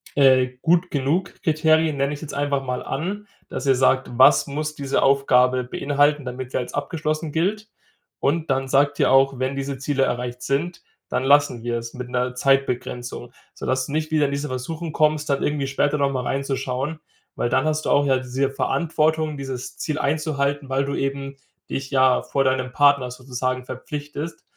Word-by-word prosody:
äh, 130 Hz, -2 st, +5 dB
gut-genug-Kriterien, 160 Hz, -1 st, +1 dB
nenne 140 Hz, +1 st, 0 dB
ich -, -, -5 dB
es -, -, -14 dB
jetzt 155 Hz, -, -7 dB
einfach 140 Hz, -1 st, 0 dB
mal 125 Hz, -1 st, -3 dB
an, 200 Hz, +8 st, -4 dB, 0.2 s
dass -, -, -5 dB
ihr 135 Hz, -1 st, +4 dB
sagt: 130 Hz, +1 st, +2 dB
Was 130 Hz, -, +6 dB
muss 155 Hz, +2 st, -3 dB
diese 140 Hz, -2 st, -1 dB
Aufgabe 130 Hz, -2 st, +3 dB
beinhalten, 145 Hz, +3 st, +1 dB
damit 125 Hz, 0 st, -6 dB
sie -, -, -1 dB
als 125 Hz, -, -5 dB
abgeschlossen 155 Hz, +1 st, -2 dB
gilt 205 Hz, +7 st, -1 dB, 0.5 s
und 160 Hz, +3 st, 0 dB
dann 135 Hz, 0 st, 0 dB
sagt 145 Hz, +2 st, +2 dB
ihr -, -, +3 dB
auch: 135 Hz, 0 st, +4 dB
„Wenn 130 Hz, +1 st, -1 dB
diese 135 Hz, 0 st, -3 dB
Ziele 135 Hz, 0 st, 0 dB
erreicht 125 Hz, -1 st, -2 dB
sind, 145 Hz, +7 st, -1 dB, 0.3 s
dann 130 Hz, -, -1 dB
lassen 140 Hz, -4 st, +3 dB
wir 120 Hz, 0 st, -1 dB
es 115 Hz, 0 st, -8 dB
mit 125 Hz, -1 st, -6 dB
'ner 125 Hz, 0 st, -1 dB
Zeitbegrenzung“, 125 Hz, -2 st, -1 dB, 0.2 s
sodass 130 Hz, 0 st, -1 dB
du -, -, -7 dB
nicht 155 Hz, 0 st, -1 dB
wieder 155 Hz, -2 st, +3 dB
in 140 Hz, -, -1 dB
diese 140 Hz, +1 st, -2 dB
Versuchung 155 Hz, +6 st, -5 dB
kommst, 155 Hz, 0 st, +1 dB
dann 140 Hz, -1 st, +1 dB
irgendwie 145 Hz, -2 st, 0 dB
später 145 Hz, +2 st, +1 dB
noch 140 Hz, -1 st, +1 dB
mal 130 Hz, -2 st, -2 dB
reinzuschauen, 135 Hz, +2 st, -2 dB, 0.4 s
weil 120 Hz, -, -1 dB
dann 130 Hz, -, +2 dB
hast 155 Hz, 0 st, -1 dB
du -, -, 0 dB
auch 145 Hz, -, +4 dB
ja 135 Hz, -2 st, +3 dB
diese 130 Hz, +2 st, -1 dB
Verantwortung, 155 Hz, +1 st, 0 dB
dieses 130 Hz, -2 st, -6 dB
Ziel 155 Hz, -1 st, -3 dB
einzuhalten, 145 Hz, -2 st, -1 dB
weil 135 Hz, +1 st, +1 dB
du 140 Hz, -, -3 dB
eben 135 Hz, 0 st, -3 dB, 0.3 s
dich, 135 Hz, 0 st, -4 dB
ja, 130 Hz, -2 st, +4 dB
vor 135 Hz, -, 0 dB
deinem 130 Hz, -1 st, 0 dB
Partner 140 Hz, -3 st, +4 dB
sozusagen 130 Hz, 0 st, -3 dB
verpflichtest. 145 Hz, +4 st, -6 dB
140 Hz, 180 wpm, -23 LUFS, 130-150 Hz, 0.5 s, Was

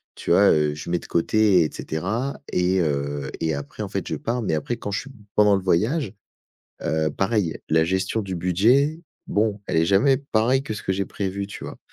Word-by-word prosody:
tu -, -, -3 dB
vois, 100 Hz, +3 st, +6 dB
heu, 75 Hz, -1 st, +2 dB
je 75 Hz, +3 st, -7 dB
mets 85 Hz, 0 st, +1 dB
de -, -, -13 dB
côté 95 Hz, +1 st, +3 dB
et 75 Hz, -, -1 dB
cetera 110 Hz, -, -3 dB
et 90 Hz, +1 st, +2 dB
heu 70 Hz, -2 st, -2 dB
et 80 Hz, -1 st, 0 dB
après, 70 Hz, 0 st, -6 dB
en -, -, -2 dB
fait, -, -, -3 dB
je -, -, -3 dB
pars 120 Hz, +2 st, -2 dB
mais 95 Hz, -8 st, 0 dB
après 80 Hz, +11 st, -2 dB
quand 105 Hz, -3 st, -6 dB
je 100 Hz, -, -1 dB
suis 135 Hz, -, -12 dB, 0.2 s
pendant 105 Hz, -1 st, +5 dB
le 95 Hz, -, -1 dB
voyage, 110 Hz, -, +1 dB, 0.7 s
heu, 80 Hz, -1 st, 0 dB
pareil, 95 Hz, -2 st, 0 dB
la 80 Hz, +1 st, +4 dB
gestion 95 Hz, +5 st, 0 dB
du 95 Hz, -1 st, -5 dB
budget, 115 Hz, -, +2 dB, 0.3 s
bon, 105 Hz, -1 st, 0 dB
elle -, -, 0 dB
est 80 Hz, -, +4 dB
jamais 105 Hz, +9 st, +4 dB
pareille 130 Hz, 0 st, +1 dB
que 110 Hz, -, -4 dB
ce 105 Hz, -, -6 dB
que -, -, -1 dB
j'ai 95 Hz, +1 st, -1 dB
prévu, 100 Hz, +1 st, -3 dB
tu 105 Hz, -, -8 dB
vois? -, -, -8 dB
95 Hz, 215 wpm, -23 LUFS, 80-110 Hz, 0.7 s, vois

